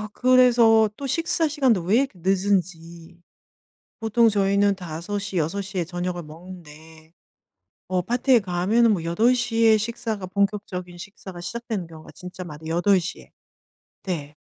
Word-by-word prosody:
아 215 - -6
그래서 240 -3 +5
또 280 - -6
식사 330 +2 0
시간도 265 - +1
왜 190 +6 +2
이렇게 275 0 0
늦은지. 175 -3 -2 0.8
보통 225 +1 +3
저희는 200 0 +2
5:00, 190 +3 -5
6:00 190 +4 -3
에 170 - 0
저녁을 175 0 -4
먹는데 160 -1 -13 0.8
어 185 -1 +1
파티에 245 +5 +2
가면은 200 +5 +2
뭐 170 -5 -3
8:00 230 +6 +1
에 220 -1 +6
식사가 220 -2 -4
본격적인 195 -2 -2
식사가 190 -1 -10
시작되는 220 -1 -5
경우가 160 -1 -13
진짜 180 0 -9
많 155 -4 -9
8:00 180 +2 +1
에 - - -20 0.7
네. 150 -6 -5
195 Hz, 250 characters per minute, -23 LUFS, 175-225 Hz, 0.8 s, 에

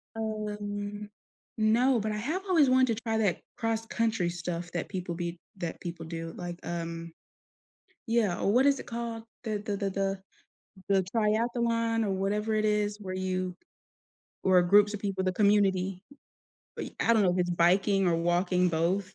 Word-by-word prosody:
Um, 210 -1 -4 0.5
no, 235 +3 +3
but 215 +1 -2
I 210 - -2
have 315 - -2
always 315 -8 +4
wanted 255 -4 +3
to - - -8
try 225 -1 0
that 200 -6 +1 0.2
cross 225 0 -1
country 225 -7 0
stuff 170 0 -4
that 175 - -3
people 180 -3 -4
be 170 0 -4 0.2
that 170 -2 -4
people 170 -2 -6
do, 165 0 -6
like, 175 -1 -6
um 170 -1 -5 1.0
Yeah, 225 -6 +1
or, 200 - +2
what 260 +4 +4
is 280 -1 +4
it - - -9
called? 230 -1 -5 0.2
The 215 -2 -1
the 205 -1 -3
the 195 -1 -1
the 195 0 -1 0.7
the 195 -1 +4
triathlon 230 +2 +1
or 195 - 0
whatever 210 +3 0
it 215 0 +1
is 210 0 +1
where 185 -1 -5
you 185 -1 -2 0.9
where 185 -2 +5
groups 205 +3 +5
of 200 - -4
people 195 -2 -2
the 185 - +1
community, 195 -2 +2 0.8
I - - -4
I 230 - +4
don't 220 -2 +4
know 180 - +4
if 185 - -1
it's 175 0 +1
biking 190 +3 +3
or 170 -1 +3
walking, 180 +2 +2
both, 175 +4 0
200 Hz, 170 wpm, -29 LUFS, 180-220 Hz, 1.0 s, where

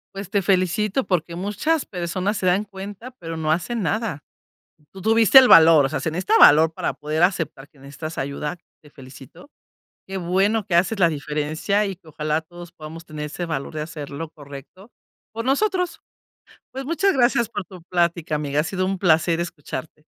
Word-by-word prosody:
Pues, 195 -1 -7
te 200 -1 0
felicito 195 +6 +1
porque 170 -2 -1
muchas 210 - -1
personas 185 +3 -2
se 185 - -3
dan 185 +3 +2
cuenta, 200 +4 -9
pero 165 -1 -7
no 155 -1 -1
hacen 220 +8 -1
nada. 205 -4 -2 0.7
Tú 195 - -12
tuviste 225 +5 +6
el 260 - +8
valor, 160 - +7
o - - +1
sea, 135 - -3
se 160 - -2
necesita 175 +4 +1
valor 160 +2 +7
para - - -2
poder 155 +2 -2
aceptar 165 -6 0
que 145 - -26
necesitas 140 +4 -8
ayuda, 145 +4 -4 0.2
te 150 - -18
felicito. 135 - -14 0.5
Qué 195 0 -5
bueno 195 +4 +1
que 180 - -3
haces 185 +5 +2
la 170 - +6
diferencia, 155 +7 -1
y 195 -2 -5
que 170 -2 -21
ojalá 155 +1 -2
todos 175 +1 -12
podamos 165 0 -10
tener 150 -1 -6
ese 175 +4 -5
valor 140 -4 -4
de 155 - -5
hacer, 150 -2 -7
lo 155 +3 -6
correcto 145 - -13 0.4
por 230 +2 -5
nosotros. 360 +5 0 0.7
Pues, 265 +1 -6
muchas 335 +6 +1
gracias 240 -3 +2
por 205 -4 -5
tu 180 0 -13
plática, 170 -2 -1
amiga. 145 -1 -1
Ha - - +2
sido 185 +3 -2
un 190 0 -2
placer 165 -1 +2
escucharte. 155 -3 -7
175 Hz, 185 wpm, -22 LUFS, 155-200 Hz, 0.7 s, el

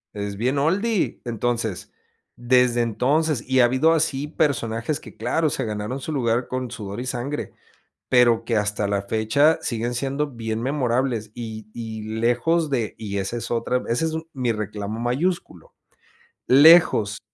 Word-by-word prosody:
Es 100 -1 -4
bien 130 +5 0
oldie, 195 +7 0
entonces, 115 -3 -2 0.5
desde 120 0 +3
entonces, 130 +5 +1
y 130 0 +3
ha 120 - +7
habido 130 +6 +3
así 150 -3 0
personajes 135 -3 -1
que, - - -13
claro, 160 -2 0
se 135 - -2
ganaron 105 +5 -4
su 155 - -5
lugar 120 -3 0
con 130 -2 -4
sudor 105 +1 -6
y - - -5
sangre, 130 +3 -4 0.6
pero, 120 -2 +4
que 115 - 0
hasta 105 0 -1
la 100 0 0
fecha 110 +10 +2
siguen 120 +1 -2
siendo 140 +4 -1
bien 115 -2 -4
memorables 125 -4 -1
y 110 -3 -7
y 110 -2 -6 0.2
lejos 150 +8 +2
de, 120 -6 -1
y 100 -2 -5
esa 100 +5 -3
es - - -6
otra, 120 +2 0
ese 120 +7 0
es 160 - -1
un 160 +1 -5
mi 125 -3 0
reclamo 105 0 -5
mayúsculo. 125 - -2 0.7
Lejos 140 -7 +6
120 Hz, 155 wpm, -23 LUFS, 110-140 Hz, 0.7 s, ha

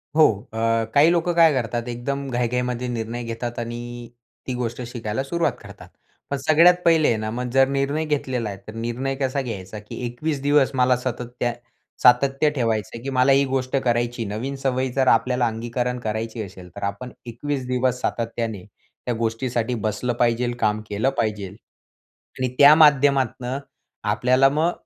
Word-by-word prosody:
हो. 155 -1 +7 0.3
अ, - - -6 0.4
काही 150 +3 +6
लोकं 175 0 +1
काय 165 -2 +6
करतात? 120 -2 -2
एकदम 140 +3 -3
घाईघाईमध्ये 125 0 -1
निर्णय 120 0 -4
घेतात 115 +1 -5
आणि 120 0 -6 0.4
ती 130 - -2
गोष्ट 120 0 -3
शिकायला 120 +1 -3
सुरुवात 170 +4 0
करतात. - - -12 0.4
पण 140 - -1
सगळ्यात 160 +6 +5
पहिले 165 -2 +5
आहे 115 - +2
ना, 110 0 -3
मग 125 +2 -3
जर 135 0 +5
निर्णय 140 +3 -1
घेतलेला 130 -7 -2
आहे, 100 - -6
तर 110 - -8
निर्णय 120 +4 -3
कसा 135 0 -1
घ्यायचा? 105 -5 -6
की 105 - -10
21 135 +4 -3
दिवस 145 -1 +3
मला 125 0 +4
सतत 125 -1 -4
त्यात 120 -1 0 0.5
सातत्य 135 +4 +5
ठेवायचं 115 -5 0
आहे, 115 - -7
की 135 - -3
मला 130 +1 +3
ही 135 +1 +5
गोष्ट 130 0 -2
करायची. 120 -1 0
नवीन 110 +7 -4
सवयी 130 -1 0
जर 130 -1 +1
आपल्याला 125 +1 +3
अंगीकरण 120 +2 -3
करायची 110 0 -3
असेल, 95 -2 -11
तर 100 - -7
आपण 100 +5 -4
21 130 +3 -4
दिवस 125 0 0
सातत्याने 115 -4 -3 0.4
त्या 125 - 0
गोष्टीसाठी 115 +1 -1
बसलं 110 +4 -1
पाहिजे 120 0 +2
काम 105 0 +1
केलं 105 +6 +1
पाहिजे. 105 -3 -1 0.9
आणि 130 -1 0
त्या 145 +1 +10
माध्यमातनं 135 -4 +3 0.5
आपल्याला 130 +5 +4
मग 160 +4 +1
125 Hz, 165 wpm, -23 LUFS, 115-135 Hz, 0.9 s, त्या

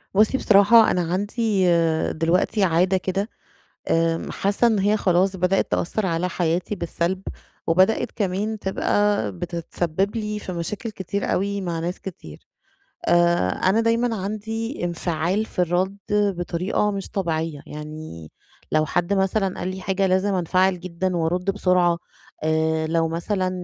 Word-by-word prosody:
بُصّي 215 +6 +4
بصراحة، 215 +1 +6
أنا 180 - +1
عندي 205 0 0 0.5
دلوقتي 180 +6 +1
عادة 180 +2 +3
كده 195 +4 -2 0.6
آمم، 165 0 +1
حاسة 200 +4 +1
إن 220 -3 +2
هي 205 +2 +2
خلاص 190 0 +2
بدأت 185 +1 +1
تأثر 210 +4 0
على 175 0 0
حياتي 175 +3 -1
بالسلب، 175 +1 -2 0.5
وبدأت 185 +6 +3
كمان 205 +2 -2
تبقى 200 - +1
بتتسبب 170 - -3
لي 210 -1 -3
في 190 - -6
مشاكل 200 +6 -4
كتير 200 0 -3
أوي 200 +1 -1
مع 170 -3 -3
ناس 175 +2 -3
كتير، 165 - -10 0.6
آآ، 175 - +3
أنا 190 - +2
دايمًا 230 +1 +1
عندي 220 +3 -4
انفعال 175 +4 -1
في - - -9
الرد 180 +3 +1
بطريقة 200 0 0
مش 195 -1 -4
طبيعية، 160 -5 -2
يعني 150 - -8 0.4
لو 155 0 +3
حد 175 +4 0
مثلًا 195 0 0
قال 175 - -3
لي 190 - -8
حاجة 195 +1 0
لازم 190 +2 +1
أنفعل 185 +1 +2
جدًا 180 +1 -2
وارد 180 +4 0
بسرعة، 180 -3 +2 0.5
آآ، 160 0 +1
لو 165 0 +1
مثلًا 185 +3 -1
185 Hz, 135 wpm, -23 LUFS, 170-200 Hz, 0.6 s, بصراحة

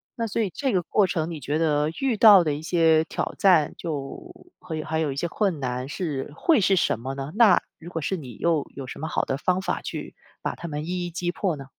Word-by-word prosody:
那 230 -2 -2
所 220 +2 -1
以 210 - 0
这 270 +5 -1
个 185 - +2
过 195 +4 +2
程 165 -2 -2
你 160 - -6
觉 145 +3 -2
得 150 -2 +1
遇 270 -4 +1
到 205 -4 +8
的 155 -3 0
一 145 - -5
些 160 -1 +3
挑 - - -3
战 175 -6 +4
就 155 - -5 0.3
会 155 -2 -5
还 160 +1 -2
有 155 -3 0
一 - - -5
些 160 +5 -1
困 185 -2 -1
难 125 0 -3
是 145 -5 -4
会 315 -9 +3
是 195 0 +4
什 140 - +1
么 130 +3 -5
呢？ 135 +1 -5
那 215 -5 +6 0.2
如 170 - -10
果 165 -2 -4
是 170 +6 -1
你 130 - -9
又 160 +2 +1
有 135 - -6
什 - - -8
么 160 - -3
好 - - 0
的 135 - -1
方 180 +5 0
法 - - -2
去 - - -6 0.3
把 - - -3
他 170 - -7
们 150 0 -4
一 180 +1 -2
一 - - -8
击 175 +1 -2
破 180 -2 -1
呢？ 135 - -9
165 Hz, 270 characters per minute, -25 LUFS, 145-185 Hz, 0.3 s, 到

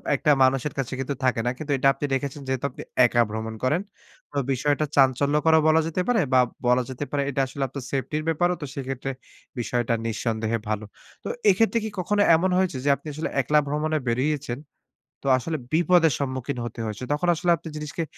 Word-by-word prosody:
একটা 150 - +2
মানুষের 130 +1 +2
কাছে 135 -2 -2
কিন্তু 135 +1 -2
থাকে 130 -2 +2
না। 125 - +2
কিন্তু 150 -2 -5
এটা 135 +1 +2
আপনি 145 - -4
রেখেছেন, 140 +2 -2
যেহেতু 130 +1 -1
আপনি - - -10 0.2
একা 120 0 +3
ভ্রমণ 110 +1 -4
করেন। 150 +8 +2 0.5
তো 145 - -5
বিষয়টা 145 +3 +1
চাঞ্চল্যকরও 145 +4 +4
বলা 160 +1 +5
যেতে 175 +3 -1
পারে 245 -2 +3
বা 130 - +6 0.3
বলা 125 +1 +4
যেতে 130 +2 -4
পারে 145 -1 0
এটা 135 0 0
আসলে 135 +2 -4
আপনার 135 0 -7
সেফটির 150 +3 -2
ব্যাপারও 175 +2 +2
তো 145 - -3
সেক্ষেত্রে, 135 -1 -4 0.5
বিষয়টা 120 0 0
নিঃসন্দেহে 115 0 -1
ভালো। 110 0 -2 0.4
তো - - -6 0.2
এক্ষেত্রে 225 +4 +3
কি 220 - -3
কখনো 205 +3 +1
এমন 185 +3 +1
হয়েছে 185 -7 +1
যে - - +3
আপনি 155 - -13
আসলে 155 +3 -3
একলা 150 +4 +3
ভ্রমণে 155 +2 0
বেরিয়েছেন, 130 +1 -1 0.6
তো - - -19
আসলে 155 +5 -3 0.2
বিপদের 165 -1 +4
সম্মুখীন 130 -1 -3
হতে 120 - -7
হয়েছে? 105 +2 -5
তখন 150 +4 -1
আসলে 175 +2 +1
আপনি 165 - -11
জিনিসকে 150 +2 -4
140 Hz, 190 wpm, -25 LUFS, 130-155 Hz, 0.6 s, বা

